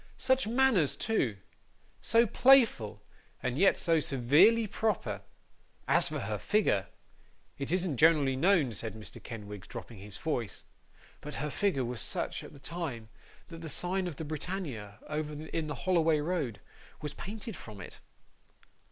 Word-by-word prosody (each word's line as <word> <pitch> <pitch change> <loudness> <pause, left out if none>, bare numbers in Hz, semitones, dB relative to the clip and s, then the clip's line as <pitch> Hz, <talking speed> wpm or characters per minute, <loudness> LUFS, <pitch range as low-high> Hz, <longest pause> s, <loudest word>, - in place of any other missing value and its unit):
Such 260 -3 +2
manners 230 - +3
too; 135 - 0 0.6
so 230 +2 +4
playful, 225 - +4 0.4
and 125 -1 -1
yet 195 +7 +4
so 165 -2 +3
sewerely 150 - +4
proper! 215 +1 -1 0.7
As - - +4
for - - -3
her - - -3
figure! 105 - +1 0.7
It 140 +2 -2
isn't 180 -6 0
generally 150 -3 +5
known,' 160 -3 +3
said 110 0 -4
Mr. 110 -1 -9
Kenwigs, 105 -4 -8
dropping 115 -4 -8
his 100 -1 -8
voice; 120 - -3 0.6
'but 150 0 -7
her 150 +1 -3
figure 185 -10 0
was 120 -2 -3
such, - - -2
at - - -10
that 140 -2 -15
time, 135 -8 -5 0.4
that 165 -1 -9
the 160 - -6
sign 180 +5 -1
of 170 - -5
the 160 - -6
Britannia, 145 - -5
over 150 0 -3
in 160 0 -3
the 150 - -4
Holloway 165 -4 +3
Road, 145 - -2 0.4
was 150 -1 -4
painted 215 +1 -7
from 105 -3 -10
it! 90 - -10
155 Hz, 150 wpm, -31 LUFS, 120-190 Hz, 0.7 s, generally